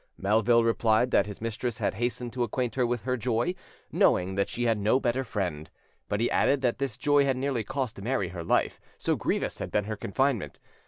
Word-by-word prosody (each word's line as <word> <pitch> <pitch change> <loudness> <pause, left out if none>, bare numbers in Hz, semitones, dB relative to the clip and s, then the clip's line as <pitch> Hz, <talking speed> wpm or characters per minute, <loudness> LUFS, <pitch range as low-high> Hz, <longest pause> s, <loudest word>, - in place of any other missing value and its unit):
Melville 110 +4 +3
replied 115 +1 +2
that - - +3
his 105 0 -8
mistress 115 0 -3
had - - 0
hastened 120 +2 -3
to 125 - -3
acquaint 120 0 -1
her 125 -1 +1
with 120 -3 -2
her 130 +1 -1
joy, 120 +8 0 0.4
knowing 90 +1 +3
that 100 +1 0
she 120 - -3
had 115 -3 +2
no 110 +6 +3
better 130 0 0
friend; 90 - -3 0.4
but 105 - 0
he 120 - +1
added 140 -1 +2
that 125 -2 0
this 135 -5 -2
joy 145 -1 +3
had 135 -2 +1
nearly 130 -3 -1
cost 130 -3 -4
Mary 110 -4 -1
her 85 -1 -6
life, - - +1 0.2
so - - 0
grievous - - -2
had - - -4
been 105 -1 0
her 110 +1 -3
confinement. 120 +2 -1
115 Hz, 210 wpm, -28 LUFS, 105-130 Hz, 0.4 s, Melville